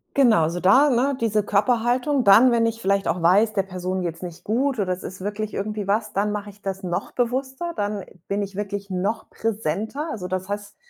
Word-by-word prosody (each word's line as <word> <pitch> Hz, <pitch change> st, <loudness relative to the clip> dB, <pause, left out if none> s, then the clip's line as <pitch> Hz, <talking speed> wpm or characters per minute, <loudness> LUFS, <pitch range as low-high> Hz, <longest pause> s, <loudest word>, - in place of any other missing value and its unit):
Genau, 220 Hz, -, +4 dB
so 175 Hz, +1 st, -4 dB
da, 230 Hz, +12 st, +5 dB
ne, 265 Hz, +2 st, +2 dB
diese 215 Hz, -2 st, +2 dB
Körperhaltung. 245 Hz, +6 st, +1 dB
Dann, 220 Hz, +6 st, +7 dB
wenn 230 Hz, -1 st, +3 dB
ich 230 Hz, 0 st, -2 dB
vielleicht 195 Hz, -1 st, +1 dB
auch 180 Hz, -, 0 dB
weiß, 200 Hz, +6 st, +4 dB
der 195 Hz, -2 st, +1 dB
Person 185 Hz, 0 st, -3 dB
geht's 165 Hz, -2 st, -4 dB
nicht 175 Hz, -2 st, -8 dB
gut 255 Hz, +5 st, 0 dB
oder 190 Hz, -2 st, 0 dB
es 180 Hz, 0 st, -4 dB
ist 185 Hz, 0 st, -8 dB
wirklich 210 Hz, +2 st, -4 dB
irgendwie 210 Hz, 0 st, -3 dB
was, 210 Hz, +2 st, 0 dB
dann 205 Hz, +1 st, 0 dB
mache 210 Hz, 0 st, -4 dB
ich 205 Hz, +1 st, -16 dB
das 195 Hz, 0 st, -4 dB
noch 175 Hz, -1 st, -3 dB
bewusster, 265 Hz, +7 st, -2 dB
dann 205 Hz, -1 st, -2 dB, 0.2 s
bin 200 Hz, +1 st, -1 dB
ich 200 Hz, -1 st, -6 dB
wirklich 200 Hz, -1 st, -4 dB
noch 195 Hz, +4 st, -2 dB
präsenter. 220 Hz, -, -3 dB
Also, 180 Hz, -8 st, -5 dB
das 185 Hz, +1 st, -3 dB
heißt 205 Hz, 0 st, -5 dB
205 Hz, 210 wpm, -23 LUFS, 190-230 Hz, 0.2 s, Dann